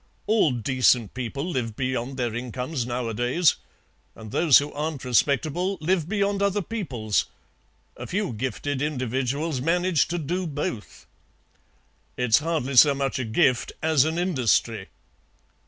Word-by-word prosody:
All 215 -6 +3
decent 125 -2 +2
people 130 +5 -4
live 125 -10 -3
beyond 130 +1 -3
their 120 -3 -1
incomes 125 +2 -4
nowadays, 120 +6 +1 0.6
and 110 -2 -10
those 155 -1 +6
who 145 +1 -1
aren't 150 -2 -4
respectable 155 - +1
live 165 0 0
beyond 200 -1 0
other 200 0 +1
peoples. 130 - -2 0.7
A - - -8
few 200 - -2
gifted 130 +4 -3
individuals 135 +1 -2
manage 175 +1 +2
to 175 - -3
do 175 +3 -2
both." 145 -7 -5 1.1
"It's 125 -1 +3
hardly 155 -4 -2
so 140 +1 +7
much 135 -1 -2
a - - -1
gift 120 +2 +1
as 160 -4 +4
an 160 +2 -2
industry." 120 - +1
140 Hz, 130 wpm, -25 LUFS, 125-165 Hz, 1.1 s, so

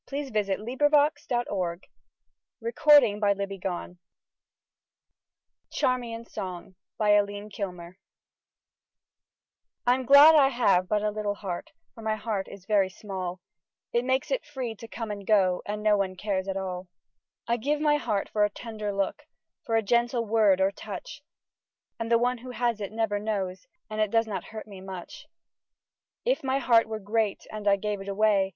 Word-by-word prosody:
Arthur 280 -1 -3
Davison 210 -1 -1
Ficke 290 +4 +3
POETRY: 190 -8 -2 0.7
A - - -11
Magazine 290 - +5
of 200 -1 +3
Verse 200 0 -2
THREE 195 - -9
POEMS 180 -1 -4 1.7
charmian's 235 -2 -2
song 185 0 -6 0.3
Tm 205 -3 0 2.2
glad 285 +3 +9
I 290 -3 +6
have 200 -8 +2
but 210 +1 0
a 210 - +1
little 205 -1 -2
heart 185 -4 -5
— - - -49
For 225 - -12
my 220 0 0
heart 215 -3 -3
is 195 -2 -12
very 200 -2 +3
small: 185 -2 -6 0.5
It 235 - +2
makes 260 +1 0
it - - 0
free 260 -6 -5
to 230 - -10
come 225 -1 -5
and 200 -1 -6
go, 190 -4 +3
And 210 +1 -4
no 215 -1 +5
one 190 -2 -1
cares 190 0 -2
at 195 0 -2
all. 185 -1 -4 0.6
I 235 +1 +1
give 290 +6 0
my 295 -1 +3
heart 215 -8 -1
for 210 - +1
a 210 - +3
tender 215 -1 -5
look, 195 -1 -2 0.4
For 225 - +1
a 225 - +3
gentle 235 +2 +1
word 210 -3 +4
or 190 +1 +3
touch; 200 +5 -8 0.8
And 230 0 -3
the 230 - +6
one 245 +1 0
who 255 +2 -10
has 235 -3 -1
it 200 - -4
never 220 -2 -1
knows, 195 -1 -3 0.2
And 215 0 -3
it 215 - +2
does 225 +1 +2
not 215 -3 -5
hurt 220 0 -8
me 195 -3 -11
much. 190 -2 -9 1.0
If - - +1
my 265 0 +1
heart 235 -5 +4
were 220 0 -4
great 215 0 -1
and 215 -1 -5
I 200 - +6
gave 205 0 -3
it 195 - -9
away. 200 -1 +2
215 Hz, 170 wpm, -27 LUFS, 195-235 Hz, 2.2 s, glad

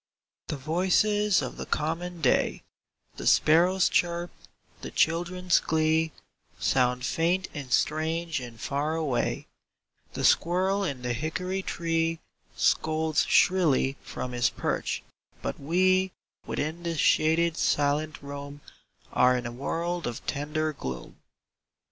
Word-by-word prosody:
TTHE 150 - -3
voices 190 +7 +2
of - - -6
the - - -6
common 165 +3 -2
day 130 - +2 0.2
— - - -46
^ - - -27
The - - -4
sparrow's 175 +4 +4
chirp, 175 0 0 0.5
the - - -6
children's 175 +2 +2
glee 160 0 +1 0.5
Sound 125 -1 +1
faint 175 +6 +1
and 140 -4 -7
strange 160 +2 0
and 120 -3 -9
far 145 +6 -1
away: 150 -7 -1 0.7
The - - -2
squirrel 190 +4 +3
in 140 -8 -3
the 125 0 -1
hickoi 180 +8 -3
3^ - - -25
tree 165 -1 0 0.4
Scolds 155 -1 +1
shrilly 155 -7 +3
from 125 - -6
his 120 -2 +2
perch, - - -2 0.4
but - - -3
we 185 +5 +2 0.3
Within 160 +4 -3
this 170 -1 -3
shaded 160 +2 +3
silent 150 0 0
room 140 0 -8 0.5
Are 125 0 +4
in 120 - -4
a 120 - -4
world 170 +7 -3
of 120 - -6
tender 150 +2 -2
gloom. 65 - -7
160 Hz, 130 wpm, -27 LUFS, 140-175 Hz, 0.7 s, sparrow's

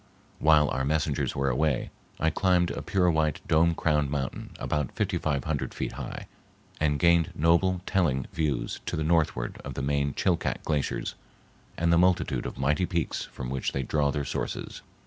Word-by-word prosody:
While 75 -1 +5
our 65 +1 -1
messengers 75 0 0
were 70 0 +1
away, 75 0 0 0.3
I 80 +1 +2
climbed 90 0 +2
a - - -4
pure 90 -3 +2
white, 80 -2 +1
dome 80 +1 +4
crowned 75 -4 +1
mountain 70 -2 -3
about 75 -3 -2
fifty - - -1
five 70 -4 -1
hundred 75 -3 -3
feet - - -3
high - - -6 0.5
and 75 -2 +2
gained 85 +2 +4
noble 85 +3 +3
telling 75 -10 +1
views 75 -5 -1
to - - -1
the 80 - -1
northward 80 -7 0
of - - -6
the 70 - -3
main 70 0 0
Chilcat - - 0
glaciers 75 -3 -1 0.6
and 85 0 +2
the 85 - +5
multitude 90 -8 +2
of - - -7
mighty 75 +7 +1
peaks 85 -4 -2
from 65 -1 -7
which 65 -1 -2
they 70 - -1
draw 70 +2 +1
their 70 -1 -2
sources. - - -4
75 Hz, 175 wpm, -27 LUFS, 70-85 Hz, 0.6 s, While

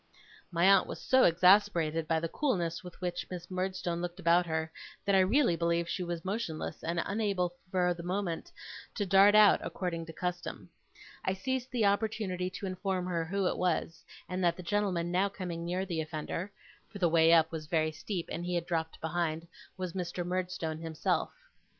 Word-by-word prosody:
My 170 0 +2
aunt 195 0 +6
was - - -6
so 260 0 +4
exasperated 170 -3 +4
by 160 0 +2
the 165 - -2
coolness 175 - -1
with 180 -1 -11
which 175 -1 -3
Miss 175 0 -7
Murdstone 185 -2 -2
looked 175 +1 -5
about 175 0 +3
her, 160 0 -2 0.3
that 200 - +2
I 190 - +6
really 205 +1 +3
believe 170 0 0
she 185 - -3
was 175 -1 -4
motionless, 195 -5 -3
and 170 +1 -1
unable 200 -4 0 0.2
for 180 -1 +2
the 170 - -8
moment 180 -1 -3 0.4
to 205 - -1
dart 195 +2 +6
out 215 -1 +7
according 170 -3 -4
to - - -7
custom. 180 +1 -5 0.5
I 190 - 0
seized 260 +6 -3
the 240 -5 +1
opportunity 200 -3 0
to 190 +2 -7
inform 185 -1 -2
her 170 -2 -1
who 195 +3 -1
it - - 0
was; 165 -2 -1 0.2
and 185 0 -3
that 170 -1 +2
the 180 - -7
gentleman 180 -3 0
now 190 +3 +2
coming 175 -4 -5
near 180 +3 -2
the 170 -4 -2
offender 160 +4 -4 0.4
(for 210 - -9
the 180 -3 +3
way 165 0 +5
up 160 -1 +5
was 155 -2 -6
very 155 -1 +1
steep, 170 +3 -4
and 170 - -3
he 180 0 -2
had 170 -1 -1
dropped 160 -2 -2
behind), 165 0 -2 0.3
was 185 -2 -4
Mr. 175 -1 -3
Murdstone 180 -3 -2
himself. 160 -2 -1
180 Hz, 185 wpm, -31 LUFS, 170-190 Hz, 0.5 s, out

